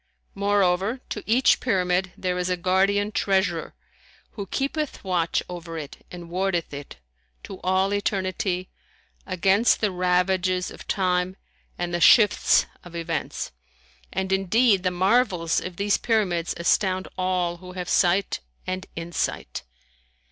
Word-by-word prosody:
Moreover, 200 +2 +1
to 210 - -5
each 245 +4 +4
Pyramid 185 -4 +1
there 180 -1 -1
is 180 0 -1
a 180 - 0
guardian 195 +3 +2
treasurer 190 -5 0 0.6
who 200 -2 -6
keepeth 280 +6 -3
watch 175 -3 0
over 170 -2 -7
it 150 -3 -8
and 175 -1 -9
wardeth 175 -2 -1
it, 140 0 -8 0.5
to 195 - -9
all 190 +2 +1
eternity, 185 -2 -1 0.6
against 195 +4 +3
the 210 -3 +1
ravages 180 0 +1
of - - -12
time 185 -1 0 0.4
and 175 0 -3
the 175 - -1
shifts 210 0 +6 0.2
of 175 -1 -12
events; 165 -2 -3 0.6
and 190 0 -2
indeed 195 +2 +3
the 185 - +1
marvels 185 -2 +2
of 180 -1 -6
these 200 +2 +1
Pyramids 190 -8 0
astound 185 +2 +1
all 180 -2 0
who 180 +1 -11
have 180 -1 -5
sight 185 +3 +2 0.3
and 185 0 -4
insight. 170 +1 -3
185 Hz, 130 wpm, -24 LUFS, 180-195 Hz, 0.6 s, shifts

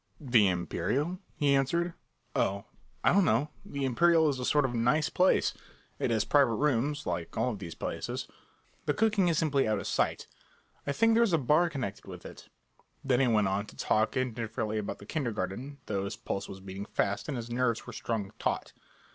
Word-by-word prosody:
"The 120 - +4
Imperial?" 140 - -1 0.2
he 145 -1 +2
answered. 170 +6 +1 0.4
"Oh, 100 +1 0 0.4
I - - +5
don't 200 +1 +5
know; 150 -1 +2
the 140 -1 -3
Imperial 160 +5 +4
is 135 -3 -2
a 125 - -2
sort 145 +1 +3
of 125 - -2
a - - -1
nice 125 +7 +2
place. 185 0 +3 0.5
It - - 0
has 110 -2 +1
private 135 -4 +4
rooms, 145 +2 0
like 85 -1 -3
all 120 +3 +1
of 105 - -6
these 85 -4 -7
places. - - -4 0.6
The - - +2
cooking 215 -4 +3
is 165 -2 +2
simply 145 -5 +2
out 110 -1 +1
of - - -5
sight. - - 0 0.6
I - - +2
think 225 +9 +3
there 230 - +4
is 225 -6 +3
a - - +6
bar 155 +5 +3
connected 130 -11 -5
with - - -9
it." - - -11 0.5
Then 130 -2 +2
he 135 - +4
went 105 -4 +3
on 100 +2 -1
to - - -13
talk 110 +3 +1
indifferently 115 -3 -2
about 105 - -4
the 100 - -12
kindergarten, 120 - -3
though 100 -2 -2
his 100 - -4
pulse 100 - -4
was 95 - -8
beating 95 +1 -6
fast, 100 +1 -1
and 145 -4 -2
his 120 0 -6
nerves 120 -1 0
were 120 - -8
strung 110 -4 -3
taut. - - -2
125 Hz, 200 wpm, -30 LUFS, 105-150 Hz, 0.6 s, a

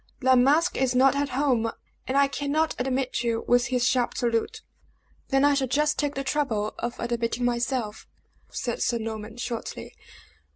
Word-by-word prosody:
"La 260 -1 +4
Masque 290 +8 +3
is 260 -1 +1
not 265 +2 +5
at 285 0 0
home, 250 -4 +1 0.4
and 265 - 0
I 280 0 +5
cannot 290 +3 -1
admit 255 0 -1
you," 230 -1 -1
was 245 0 +3
his 250 -1 0
sharp 250 -2 +1
salute. 240 - -1 0.6
"Then 270 +1 +3
I 290 - +5
shall 275 -2 0
just 295 +4 +1
take 290 -1 -1
the 275 - -2
trouble 255 -7 -1
of 235 0 -4
admitting 235 0 -1
myself," 240 -2 -2 0.4
said 240 - -4
Sir 240 - +1
Norman, 220 0 -6
shortly. 240 -1 -5
255 Hz, 165 wpm, -26 LUFS, 235-280 Hz, 0.6 s, not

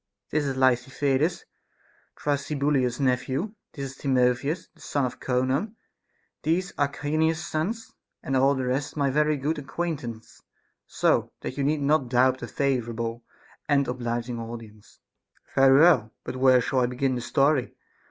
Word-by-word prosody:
This 150 -1 +1
is 135 -1 -2
Lysithides, 135 +4 +1 0.7
Thrasybulus's 140 -3 0
nephew; 135 +8 0 0.2
this 135 -1 -6
Timotheus, 135 +4 +1
the - - -22
son 145 -2 -1
of 125 - -5
Conon; 130 - 0 0.7
these 180 +4 0
Archinus's 155 +3 0
sons; 210 +9 -3 0.3
and 135 - -1
all 135 +2 +4
the 130 -1 -2
rest 135 +4 -2
my 140 -2 +2
very 150 +1 +2
good 150 +3 -1
acquaint 160 +1 -3
ance, 115 -2 -9 0.5
so - - +1
that - - -5
you 140 - -1
need 145 +1 +1
not 140 -3 +2
doubt 130 +1 +3
a 120 - -5
favorable 120 -4 -2 0.5
and 140 -1 +3
obliging 120 -1 -3
audience. 115 -2 -10 0.5
Caph. - - -28
Very 135 0 +6
well; 130 -11 +5
but - - -5
where 130 -1 +5
shall 130 +2 0
I 125 - +3
begin 130 +2 0
the 125 - -2
story 140 +1 +1
135 Hz, 145 wpm, -26 LUFS, 125-150 Hz, 0.7 s, Very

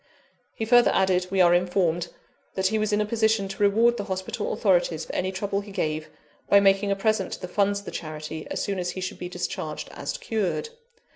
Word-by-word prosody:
He 220 - -2
further 240 +1 +6
added, 185 -1 +2
we 190 0 +2
are 175 -1 +6
informed, 175 -1 +1 0.5
that 190 - -1
he 220 +1 0
was 215 0 0
in 210 0 +2
a - - +1
position 220 -2 +1
to 195 +1 -7
reward 225 +4 +4
the 205 - -4
hospital 190 -2 -3
authorities - - +1
for - - -8
any 185 - -1
trouble 200 +1 -2
he 200 0 -11
gave, 155 -4 -2 0.4
by 200 - +7
making 195 0 +3
a 200 - +2
present 200 -1 0
to - - -6
the - - -4
funds 200 +2 +1
of 200 - -8
the - - -6
charity, 155 0 -6
as - - -2
soon 195 -2 -2
as 180 0 -2
he 180 - -5
should 185 - -5
be 180 - -5
discharged 175 -4 -4
as - - -5
cured. 225 - -2
195 Hz, 220 wpm, -25 LUFS, 180-215 Hz, 0.5 s, by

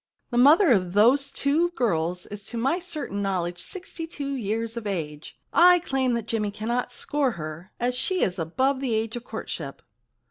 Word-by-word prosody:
The 240 - -1
mother 305 +6 +7
of 185 -5 +2
those 255 +7 +4
two 310 +5 +1
girls 180 - 0
is 205 0 -8
to 235 - -5
my 270 +9 +1
certain 305 - -4
knowledge 180 -3 -2
sixty 355 - -6
two 280 -4 -4
years 225 -1 -2
of 230 -3 -5
age. 155 -6 -5 0.2
I 355 +1 +7
claim 265 -7 0
that 230 -2 -3
Jimmy 215 -3 -1
cannot 235 +4 -2
score 270 +1 0
her, 155 +3 -7
as 245 +1 0
she 365 +9 +1
is 185 0 -1
above 260 - 0
the 255 -4 -1
age 220 +1 -1
of 240 - -5
courtship.' 165 - -6
235 Hz, 180 wpm, -25 LUFS, 195-275 Hz, 0.2 s, mother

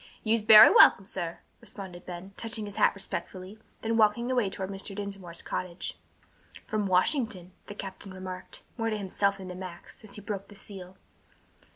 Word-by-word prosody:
"You's 225 0 +2
bery 215 0 +10
welcom, 195 - +7
sah," 175 -4 -4 0.3
responded 185 -3 -9
Ben, 180 +2 -8
touching 225 -1 -4
his 205 - -9
hat - - +4
respectfully, 190 +1 -5 0.2
then 225 0 0
walking 225 +3 +3
away 245 -6 +2
toward 190 0 -5
Mr. 195 0 -4
Dinsmore's 195 -4 -6
cottage. 180 -1 -4 0.7
"From 215 -2 -1
Washington," 185 - +1 0.2
the 205 - -8
captain 195 -1 -7
remarked, 185 0 -8 0.2
more 225 0 0
to 215 - -1
himself 200 0 0
than 190 -1 -8
to - - -5
Max, 180 +2 -10
as 215 - -7
he 210 - -7
broke 200 -1 -5
the 205 - -14
seal. 190 -2 -10
195 Hz, 170 wpm, -28 LUFS, 185-215 Hz, 0.7 s, bery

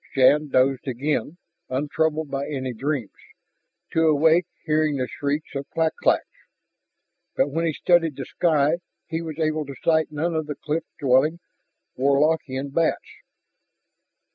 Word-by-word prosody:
Shann 145 +3 +5
dozed 135 0 +2
again, 145 +5 -2 0.3
untroubled 150 +2 -1
by 140 0 -2
any 130 -3 -3
dreams, 135 -2 -3 0.8
to 160 0 +3
awake 160 +3 +4 0.2
hearing 155 -2 +1
the 130 -1 -1
shrieks 145 +4 -3
of 140 0 -5
clak 160 -1 0
claks. - - +3 1.1
But 140 - +1
when 165 +3 0
he 160 - 0
studied 165 -2 +2
the 135 - -5
sky 155 -1 +2 0.3
he 160 0 -3
was 160 -2 -6
able 155 -2 -1
to 140 - -7
sight 160 -2 +2
none 160 +3 -1
of 155 -1 -2
the 150 - -4
cliff 155 +3 -3
dwelling 140 +5 +3 0.6
Warlockian 140 -1 +1
bats. 165 +1 0
150 Hz, 140 wpm, -24 LUFS, 140-160 Hz, 1.1 s, Shann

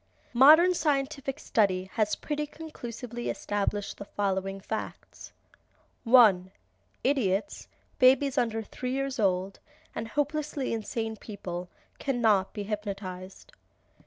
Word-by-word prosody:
Modern 310 +9 +7
scientific 275 -3 -1
study 190 -3 +1
has 215 -1 +1
pretty 300 0 -3
conclusively 240 -6 -7
established 205 0 -2
the 200 - -8
following 195 -1 -2
facts: 220 +3 -7 0.7
1. 215 -7 +6 0.5
Idiots, 245 -4 0 0.3
babies 265 +1 +5
under 225 -4 0
three 250 +4 -5
years 275 -1 -2
old, 190 -1 0 0.3
and 225 - -4
hopelessly 290 0 -2
insane 225 0 -3
people 180 -5 -7 0.3
cannot 220 -8 +2
be 205 - -5
hypnotized. 195 - -6
225 Hz, 100 wpm, -28 LUFS, 195-275 Hz, 0.7 s, Modern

